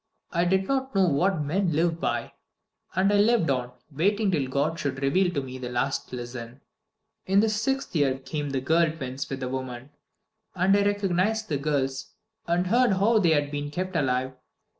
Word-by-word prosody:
I 170 0 +1
did 190 +2 +1
not 265 -3 -1
know 195 -1 +5
What 170 +2 +1
men 175 +4 0
live 165 +2 +1
by. - - -2 0.6
And 195 +3 +3
I - - +4
lived 210 -6 +3
on, 125 -2 -2 0.2
waiting 200 +7 +1
till 145 -7 0
God 145 +5 -1
should 135 -2 -2
reveal 175 +7 +2
to 140 - 0
me 130 0 -8
the 125 -1 -5
last 125 +3 -2
lesson. 120 +1 -7 0.7
In 195 +1 +4
the 220 +1 +3
sixth 225 +3 -1
year 140 -4 +2
came 145 +2 -4
the 135 -1 -2
girl 160 +4 +3
twins 135 -4 -5
with 135 0 -5
the 130 - -2
woman; 130 +1 -5 0.6
and 185 +2 +3
I 200 - +3
recognized 205 +2 0
the 145 -3 0
girls, 140 +4 -2 0.3
and 175 +2 +1
heard 240 +3 +3
how 215 +4 +3
they 175 -5 +3
had 145 -1 0
been 145 0 -3
kept 185 +4 -4
alive. 130 -3 0
160 Hz, 185 wpm, -26 LUFS, 135-195 Hz, 0.7 s, know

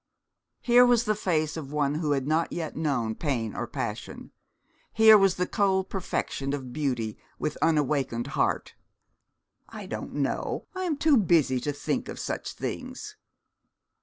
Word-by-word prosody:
Here 245 0 +6
was 245 -2 +4
the 215 - +1
face 160 -7 0
of 145 -4 -6
one 145 -1 +1
who 150 -1 0
had 135 -2 -1
not 160 +3 +1
yet 165 -3 -4
known 135 -8 0
pain 120 -6 -2
or - - -3
passion. - - -5 0.6
Here 220 -1 +8
was 195 -3 +4
the 180 - 0
cold 190 -1 +1
perfection 140 -7 -2
of 130 -3 -8
beauty 125 -7 -2 0.2
with 150 - -2
unawakened 140 -6 +1
heart. - - 0 1.0
'I - - -8
don't - - -6
know; - - -2
I 370 0 -3
am 315 -5 -1
too 300 -2 +4
busy 160 - +3
to 145 +4 -2
think 145 - -3
of - - -6
such - - -4
things.' - - -6
155 Hz, 155 wpm, -27 LUFS, 135-195 Hz, 1.0 s, Here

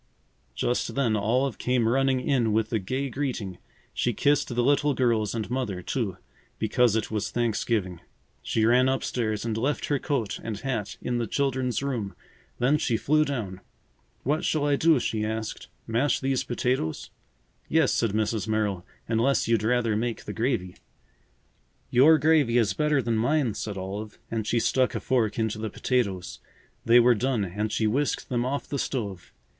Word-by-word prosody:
Just 120 - -1
then 125 -6 +2
Olive 120 +5 0
came 125 -2 +1
running 130 +1 +2
in 120 -5 +1
with 110 +1 0
a 110 - +2
gay 130 +8 -2
greeting. 125 -9 -4 0.3
She 120 - 0
kissed 145 +6 +2
the 120 -1 0
little 145 +1 +2
girls 115 -4 +1
and 110 -3 -2
Mother, 110 -9 -2
too, 100 -7 -2 0.4
because 115 +1 +2
it 110 -1 -1
was 105 -2 -1
Thanksgiving. 110 -6 -1 0.4
She 110 - 0
ran 125 +3 +4
up 135 0 0
stairs 110 -3 -2
and 115 -2 -1
left 135 +6 -1
her 145 -2 +1
coat 130 -9 -2
and 110 -2 -4
hat 120 -6 -3
in 120 -1 -1
the 115 - -1
children's 130 0 -1
room. 120 -8 -3 0.4
Then 135 +5 +2
she 115 -5 +1
flew 155 +5 +3
down. 110 -11 -4 0.6
"What 150 +4 0
shall 150 -2 +1
I 145 -1 +3
do?" 160 -1 +4
she 110 -2 -1
asked. 110 0 -4 0.2
"Mash 120 +6 +1
these 135 -1 0
potatoes?" 125 -9 -2 0.6
"Yes," 160 -4 +3
said 115 -4 +1
Mrs. 110 -1 -1
Merrill. 105 -4 0 0.2
"Unless 115 +4 +2
you'd 115 -2 +2
rather 115 0 +1
make 115 +1 -2
the 105 - -5
gravy." 110 -6 -1 1.1
"Your 145 +6 +6
gravy 150 -5 +3
is 115 -3 +2
better 150 -3 +1
than 115 -1 0
mine," 125 0 +1
said 105 -1 -5
Olive 100 +3 -6
and 110 -2 -2
she 120 - +2
stuck 130 +2 +1
a - - -1
fork 115 -5 0
into 110 -2 -1
the 110 0 -3
potatoes. 100 -6 -1 0.5
They 120 +1 +7
were 120 +1 +6
done 120 -2 0
and 105 +4 -3
she 110 - 0
whisked 135 +7 0
them 120 -1 0
off 135 +3 -2
the 140 - -3
stove. 100 -11 -4
120 Hz, 170 wpm, -26 LUFS, 110-135 Hz, 1.1 s, They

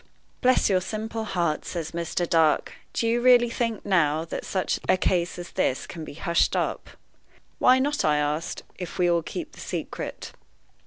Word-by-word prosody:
"Bless 255 0 +4
your 185 -2 +2
simple 220 +3 -4
heart!" 170 -6 -1
says 165 -3 -4
Mr. 170 +1 -2
Dark, 160 -3 +3 0.2
"do 230 - -1
you 235 +1 +2
really 240 -1 +6
think, 230 -2 -2
now, 160 -5 +2
that - - -5
such 185 -1 -1
a - - +5
case 175 -1 0
as 175 0 -8
this 130 - 0
can 165 - -8
be 150 - -9
hushed 170 +2 +1
up?" - - -2 0.7
"Why 255 +1 +6
not," 285 +3 0
I 150 -1 +3
asked, 150 +2 -2 0.2
"if 175 -2 -6
we 180 -1 +3
all 170 -1 +3
keep 320 - -6
the - - -15
secret?" - - -5
180 Hz, 175 wpm, -25 LUFS, 165-230 Hz, 0.7 s, really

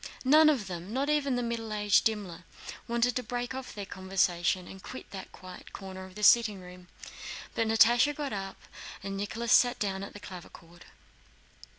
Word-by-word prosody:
None 310 +4 +7
of 265 -9 +1
them, 180 +1 -7
not 275 +5 0
even 280 -3 +1
the 245 - -1
middle 230 -2 -3
aged 210 -1 +3
Dimmler, 205 -6 -2 0.4
wanted 235 +1 +1
to 250 - 0
break 245 +1 -4
off 260 -3 -7
their 205 -1 -5
conversation 185 -1 0
and 190 - -11
quit 260 - -8
that 190 -1 -8
corner 185 +1 -10
in 185 - -16
the 210 - -7
sitting 215 -3 +5
room, 180 0 -13 0.7
but 225 - 0
Natásha 240 +6 +5
got 285 -4 -4
up 195 -1 -5 0.4
and 195 0 -4
Nicholas 225 +4 -1
sat 245 0 +5
down 195 -2 -2
at 200 - -7
the 205 - -9
clavichord. 175 -2 -12
210 Hz, 175 wpm, -29 LUFS, 190-245 Hz, 0.7 s, None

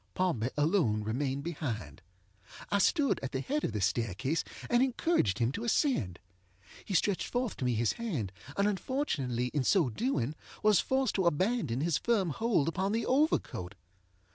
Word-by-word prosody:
Pompey 150 -11 0
alone 145 - +2
remained 135 +5 -2
behind. 115 - -4 0.7
I 200 - +3
stood 285 - +2
at 135 - -5
the 130 - 0
head 295 - -2
of - - 0
the 105 -1 -3
staircase, 110 - 0 0.2
and 240 0 +3
encouraged 255 - +1
him 115 +1 +1
to 220 - -5
ascend. 225 - +1 0.7
He 195 - -3
stretched 195 +2 +1
forth 245 -2 -2
to 130 - -3
me 125 -2 +1
his 115 0 +1
hand, 155 - -3 0.3
and 200 +1 +3
unfortunately 155 - -1
in 145 -3 +1
so 160 - +3
doing 150 - -1 0.3
was 210 -4 +5
forced 265 -3 +1
to 190 -3 +2
abandon 170 - +1
his 165 -1 +1
firm 205 -8 +1
hold 210 - +1
upon 190 +4 0
the 230 - 0
overcoat. 255 - 0
165 Hz, 165 wpm, -31 LUFS, -, 0.7 s, was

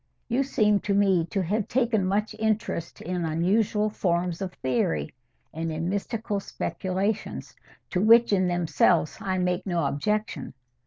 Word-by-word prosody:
You 245 +3 +1
seem 215 -6 +2
to 200 -1 -1
me 190 -4 +3
to 195 0 -1
have 205 +4 -1
taken 230 -6 +1
much 210 +3 0
interest 215 -6 -2
in 180 0 -3
unusual 205 +6 +1
forms 175 -2 -1
of 190 -2 -3
theory, 80 - -1 0.4
and 165 +1 -3
in 165 +2 -2
mystical 205 +1 -2
speculations, 195 +2 -3 0.4
to 180 - +1
which 230 +1 +6
in 185 -2 +3
themselves 175 -1 +2
I 190 -1 -1
make 180 0 0
no 170 -4 0
objection. 210 +4 -2
190 Hz, 145 wpm, -26 LUFS, 170-210 Hz, 0.4 s, which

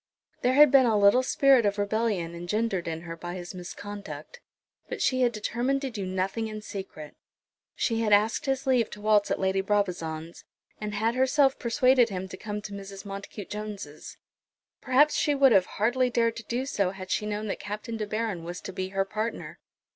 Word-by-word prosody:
There 255 +1 +2
had 295 -1 +8
been 265 -2 +6
a 220 -2 +3
little 200 +5 +6
spirit 265 -1 +4
of 205 0 +1
rebellion 205 -4 -1
engendered 185 +2 -2
in 165 -1 -3
her 165 -1 -7
by 175 +1 -6
his 175 0 -7
misconduct; 205 - -8 0.5
but - - -4
she 255 0 +1
had 245 -1 +4
determined 240 +5 -1
to 270 - -3
do 200 -4 -4
nothing 190 +4 -2
in 215 -1 -7
secret. 190 -8 -8 0.6
She 230 -2 0
had 215 -2 0
asked 210 +6 +3
his 270 0 0
leave 250 -4 +2
to 210 - -10
waltz 210 -1 +3
at - - 0
Lady 190 0 +1
Brabazon's, 175 -5 -2 0.4
and 210 -1 -4
had 225 +3 +1
herself 265 +2 +3
persuaded 250 0 +3
him 190 -1 -4
to - - -7
come 210 +1 -5
to 210 - -7
Mrs. 195 0 -8
Montacute 200 0 -8
Jones'. 205 -8 -7 0.6
Perhaps 280 +4 +4
she 295 - +2
would 275 -2 +5
hardly 225 +6 +2
have 245 - -6
dared 230 -1 +2
to 230 - -7
do 245 +4 -2
so 200 -8 0
had 190 0 -8
she 210 - 0
known 210 0 -3
that 200 - -3
Captain 210 +3 -5
De 215 -1 -3
Baron 215 -5 -2
was 175 +1 -6
to 190 - -7
be 185 0 -3
her 195 0 0
partner. 215 +3 -4
210 Hz, 195 wpm, -27 LUFS, 195-235 Hz, 0.6 s, had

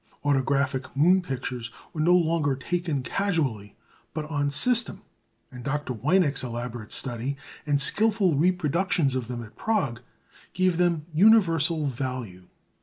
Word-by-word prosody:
Autographic 140 -1 +1
moon 180 +6 +5
pictures 125 -6 -5 0.2
were 155 - -2
no 175 +3 +5
longer 160 -5 +1
taken 160 0 -2
casually, 135 - -2 0.4
but 155 -1 -3
on 145 -1 0
system; 235 - +1 0.5
and 125 -1 -10
Dr. 145 -1 -2
Weinek's 145 - +2
elaborate 120 -2 -6
study, 125 +2 -3 0.3
and 145 -1 +2
skilful 210 +3 +3
reproductions 170 -2 +1
of 130 -3 -3
them 120 -1 -5
at 110 - -14
Prague, 145 - -1 0.5
gave 185 -2 +1
them 170 -4 +1
universal 165 -5 +4
value. 125 -9 -5
145 Hz, 125 wpm, -26 LUFS, 130-175 Hz, 0.5 s, moon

